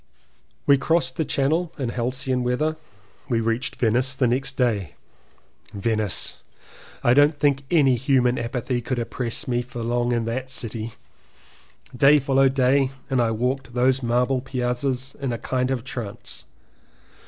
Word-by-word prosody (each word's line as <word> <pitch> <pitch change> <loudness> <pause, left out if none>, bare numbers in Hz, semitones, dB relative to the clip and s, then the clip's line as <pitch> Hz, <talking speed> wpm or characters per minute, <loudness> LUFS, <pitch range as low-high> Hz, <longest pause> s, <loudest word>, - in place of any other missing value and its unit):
We 140 -1 +5
crossed 135 -2 +1
the 160 - 0
channel 155 +6 0
in 130 -5 -2
Halcyon 125 +2 -1
weather. 125 +6 0 0.5
We 115 -3 +2
reached 115 +2 -1
Venice 125 +3 +2
the 130 - +1
next 130 +3 -1
day. 110 -7 0 0.8
Venice! 110 -1 0 0.6
I 120 - +5
don't 145 +2 +4
think 140 -2 +2
any 140 -7 +4
human 125 -1 +2
apathy 120 +1 -2
could 125 +2 -3
oppress 120 +4 -2
me 120 -1 +1
for 120 -1 -7
long 120 +1 0
in 120 -1 0
that 125 +3 -3
city 115 -2 -5 0.5
— - - -27 0.2
day 140 +4 +6
followed 135 -1 +2
day 135 +1 +3 0.2
and 130 -2 +3
I 115 - +2
walked 125 +2 -2
those 130 +2 +3
marble 125 +2 +1
piazzas 130 +1 -2
in 135 -3 -1
a 120 - -2
kind 130 +2 -1
of 130 -3 -1
trance. 120 -6 -7
125 Hz, 150 wpm, -23 LUFS, 120-135 Hz, 0.8 s, day